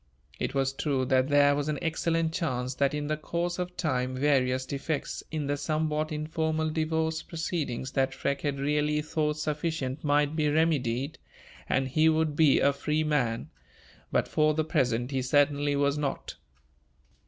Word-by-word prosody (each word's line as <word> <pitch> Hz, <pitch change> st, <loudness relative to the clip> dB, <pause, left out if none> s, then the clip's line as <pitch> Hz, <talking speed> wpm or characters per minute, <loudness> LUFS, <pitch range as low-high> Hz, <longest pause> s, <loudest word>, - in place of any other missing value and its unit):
It -, -, -2 dB
was 135 Hz, 0 st, +1 dB
true 135 Hz, -2 st, 0 dB
that 130 Hz, 0 st, +2 dB
there 145 Hz, 0 st, +5 dB
was 145 Hz, +1 st, -2 dB
an 150 Hz, -, -1 dB
excellent 165 Hz, 0 st, 0 dB
chance 130 Hz, -7 st, -2 dB
that 140 Hz, +2 st, +1 dB
in 150 Hz, 0 st, -2 dB
the 155 Hz, +1 st, -1 dB
course 170 Hz, +3 st, -3 dB
of 180 Hz, 0 st, -4 dB
time 130 Hz, -5 st, -1 dB
various 130 Hz, -2 st, +2 dB
defects 140 Hz, +2 st, -3 dB
in 155 Hz, -2 st, -3 dB
the 145 Hz, +1 st, -1 dB
somewhat 155 Hz, 0 st, -1 dB
informal 155 Hz, +1 st, -1 dB
divorce 160 Hz, 0 st, 0 dB
proceedings 155 Hz, -6 st, -3 dB
that 135 Hz, -1 st, +1 dB
Freke 140 Hz, +1 st, -2 dB
had 145 Hz, -1 st, -1 dB
really 150 Hz, +1 st, +1 dB
thought 150 Hz, -1 st, -1 dB
sufficient 150 Hz, -2 st, -2 dB
might 145 Hz, 0 st, +2 dB
be 150 Hz, -2 st, +2 dB
remedied, 145 Hz, -3 st, 0 dB, 0.5 s
and 135 Hz, 0 st, +1 dB
he 155 Hz, +4 st, +3 dB
would 155 Hz, -1 st, +1 dB
be 155 Hz, -3 st, +5 dB
a 140 Hz, -, +3 dB
free 150 Hz, +2 st, -1 dB
man; 130 Hz, -7 st, 0 dB, 0.6 s
but, -, -, +1 dB
for 155 Hz, 0 st, +2 dB
the 155 Hz, -, +1 dB
present, 125 Hz, -6 st, 0 dB
he 135 Hz, -1 st, 0 dB
certainly 145 Hz, +2 st, +2 dB
was 140 Hz, +1 st, +1 dB
not. 140 Hz, -2 st, -3 dB
150 Hz, 165 wpm, -28 LUFS, 135-155 Hz, 0.6 s, there